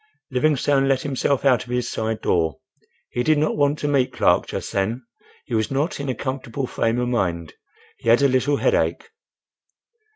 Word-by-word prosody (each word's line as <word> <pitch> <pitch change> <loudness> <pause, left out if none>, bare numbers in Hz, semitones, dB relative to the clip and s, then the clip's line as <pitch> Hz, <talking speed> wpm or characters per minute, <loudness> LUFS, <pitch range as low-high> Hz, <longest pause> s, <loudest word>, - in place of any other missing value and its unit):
Livingstone 140 +1 +2
let 135 -1 +1
himself 140 0 0
out 125 -4 +4
of 120 - -16
his 125 0 -1
side 110 0 -3
door. 80 -5 +1 0.5
He 120 - -1
did 155 +4 +3
not 155 +1 +1
want 145 0 +2
to 145 - -2
meet 140 -3 +2
Clark - - +2
just - - -5
then. 110 +6 -1 0.4
He 125 - -8
was 110 -1 +1
not 145 +8 -1
in 140 -1 -4
a 130 - -1
comfortable 130 0 -4
frame 115 -1 -1
of 125 0 0
mind. 85 -9 -1 0.5
He 115 - -2
had 120 +4 +5
a - - +6
little 130 +2 +1
headache. 460 - 0
130 Hz, 185 wpm, -22 LUFS, 115-140 Hz, 0.5 s, a